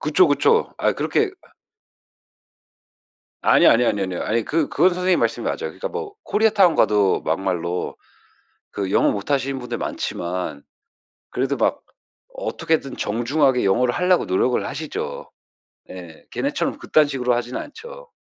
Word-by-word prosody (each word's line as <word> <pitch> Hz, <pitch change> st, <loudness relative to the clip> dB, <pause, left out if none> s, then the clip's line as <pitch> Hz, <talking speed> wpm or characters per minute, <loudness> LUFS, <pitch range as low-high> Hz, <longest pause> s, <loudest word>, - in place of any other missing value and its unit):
그쵸, 155 Hz, +4 st, +4 dB
그쵸. 455 Hz, -, +2 dB
아 -, -, +2 dB
그렇게 430 Hz, -3 st, 0 dB
아 -, -, -23 dB, 1.9 s
아니, 170 Hz, -, +5 dB
아니, 120 Hz, +1 st, +5 dB
아니요, 100 Hz, -4 st, +1 dB
아뇨. 90 Hz, -2 st, -4 dB
아니 115 Hz, 0 st, 0 dB
그 160 Hz, -1 st, 0 dB
그건 180 Hz, +5 st, +3 dB
선생님 180 Hz, 0 st, +1 dB
말씀이 -, -, -1 dB
맞아요. -, -, -1 dB
그러니까 -, -, -5 dB
뭐 410 Hz, -4 st, -6 dB
코리아타운 210 Hz, -5 st, +3 dB
가도 105 Hz, -2 st, +2 dB
막말로 90 Hz, -2 st, -2 dB, 0.8 s
그 100 Hz, -2 st, -3 dB
영어 -, -, +3 dB
못하시는 135 Hz, +5 st, -1 dB
분들이 120 Hz, -1 st, -5 dB
많지만 85 Hz, -5 st, -4 dB, 0.7 s
그래도 -, -, -1 dB
막 -, -, 0 dB, 0.5 s
어떻게든 150 Hz, -5 st, -2 dB
정중하게 125 Hz, +3 st, +1 dB
영어를 120 Hz, +5 st, +2 dB
하려고 180 Hz, 0 st, +2 dB
노력을 120 Hz, +7 st, +1 dB
하시죠. 150 Hz, +2 st, -5 dB, 0.6 s
예. 85 Hz, -3 st, -11 dB
걔네처럼 -, -, -2 dB
그딴 155 Hz, -1 st, +3 dB
식으로 125 Hz, -3 st, 0 dB
하지는 120 Hz, +1 st, -3 dB
않죠. 480 Hz, +7 st, -11 dB
130 Hz, 325 characters per minute, -22 LUFS, -, 1.9 s, 아니